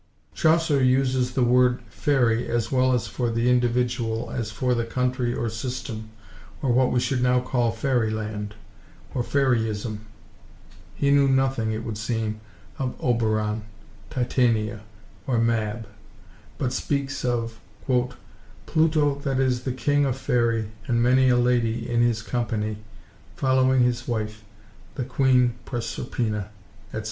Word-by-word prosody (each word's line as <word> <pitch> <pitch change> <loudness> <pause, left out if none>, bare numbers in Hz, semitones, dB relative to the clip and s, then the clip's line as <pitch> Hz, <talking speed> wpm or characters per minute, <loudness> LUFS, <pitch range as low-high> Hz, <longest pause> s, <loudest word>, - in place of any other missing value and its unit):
Chaucer 160 -3 +3
uses 130 -1 +2
the 125 - +2
word 125 0 +3
faërie 125 -5 +1
as 115 -2 -1
well 130 -1 +3
for 120 +1 -2
the 115 +2 +1
individual 120 -2 0
as 115 -3 -3
for 125 +3 0
the 120 -1 0
country 125 +1 -1
or 120 - -2
system, 115 -1 -5 0.5
or 135 - 0
what 125 +1 +3
we 125 - +2
should 125 +1 0
now 125 0 +3
call 125 -2 0
fairy–land, 110 -5 -2 0.6
or 125 - 0
faryism. 115 -5 0 1.0
He 140 -1 +1
knew 140 -1 +5
nothing, 130 -4 +1
it 110 +1 -3
would 110 -2 -5
seem, 110 -1 -2 0.4
of 130 -2 -2
Oberon, 110 -3 0 0.5
Titania, 115 -4 0 0.5
or 125 -3 +1
Mab, 115 -1 0 0.7
but 130 -3 -1
speaks 140 -1 -2
of— 115 -2 -1 0.3
"Pluto, 145 +4 -1
that 135 -2 -1
is 130 -2 +1
the 130 - 0
King 145 +3 +1
of 135 -2 -1
Faerie, 115 -4 0 0.2
And 120 -1 +2
many 130 +1 +4
a 125 - +4
ladie 120 -2 +1
in 120 0 +1
his 115 -2 +1
compagnie, 110 -3 -2 0.6
Folwing 130 -1 +3
his 120 -1 0
wif, 110 -2 -3 0.5
the 130 - -2
quene 125 -1 +3
Proserpina, 115 -4 -3 0.4
etc." - - -5
120 Hz, 135 wpm, -25 LUFS, 115-130 Hz, 1.0 s, knew